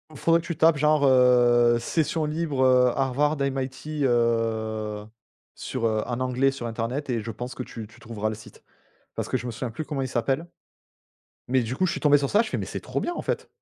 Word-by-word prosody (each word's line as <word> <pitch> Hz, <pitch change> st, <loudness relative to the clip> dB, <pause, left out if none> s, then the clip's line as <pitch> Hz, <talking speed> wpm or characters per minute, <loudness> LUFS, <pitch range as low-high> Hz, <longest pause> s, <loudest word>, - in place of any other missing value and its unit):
Faudrait 165 Hz, +4 st, +2 dB
que -, -, -14 dB
tu 170 Hz, -2 st, -4 dB
tapes 160 Hz, -1 st, +4 dB
genre, 150 Hz, 0 st, +3 dB
heu, 120 Hz, -2 st, +5 dB
session 155 Hz, +5 st, -1 dB
libre, 150 Hz, -3 st, 0 dB
heu, 125 Hz, -1 st, +5 dB
Harvard, 140 Hz, +3 st, +1 dB
MIT, 135 Hz, +2 st, -3 dB
heu, 110 Hz, -3 st, 0 dB, 0.5 s
sur, 125 Hz, -3 st, -4 dB
heu, 110 Hz, -1 st, 0 dB
un 120 Hz, 0 st, -3 dB
onglet 130 Hz, +1 st, +1 dB
sur 135 Hz, -3 st, -6 dB
internet 120 Hz, +5 st, -3 dB
et 120 Hz, -3 st, 0 dB
je 115 Hz, +2 st, -5 dB
pense 125 Hz, +4 st, -7 dB
que 125 Hz, -, -4 dB
tu 115 Hz, -3 st, -8 dB
tu -, -, -19 dB
trouveras 110 Hz, -2 st, -4 dB
le 110 Hz, -, -2 dB
site 105 Hz, 0 st, -15 dB, 0.5 s
parce -, -, -3 dB
que -, -, -2 dB
je -, -, -2 dB
me 120 Hz, -, -3 dB
souviens 115 Hz, +1 st, -5 dB
plus 140 Hz, +8 st, -5 dB
comment 145 Hz, -3 st, -4 dB
il 130 Hz, -, -1 dB
s'appelle 135 Hz, +5 st, -1 dB, 1.0 s
mais 130 Hz, 0 st, +2 dB
du 115 Hz, +3 st, -4 dB
coup 185 Hz, -, +1 dB
je -, -, 0 dB
suis -, -, -4 dB
tombé 145 Hz, -1 st, +5 dB
sur 140 Hz, -1 st, -2 dB
ça 210 Hz, -, +4 dB
je 225 Hz, -, -5 dB
fais: -, -, -2 dB
«Mais -, -, -4 dB
c'est -, -, -5 dB
trop -, -, -3 dB
bien 350 Hz, -, -2 dB
en -, -, -4 dB
fait!» -, -, -3 dB
130 Hz, 230 wpm, -25 LUFS, 115-145 Hz, 1.0 s, heu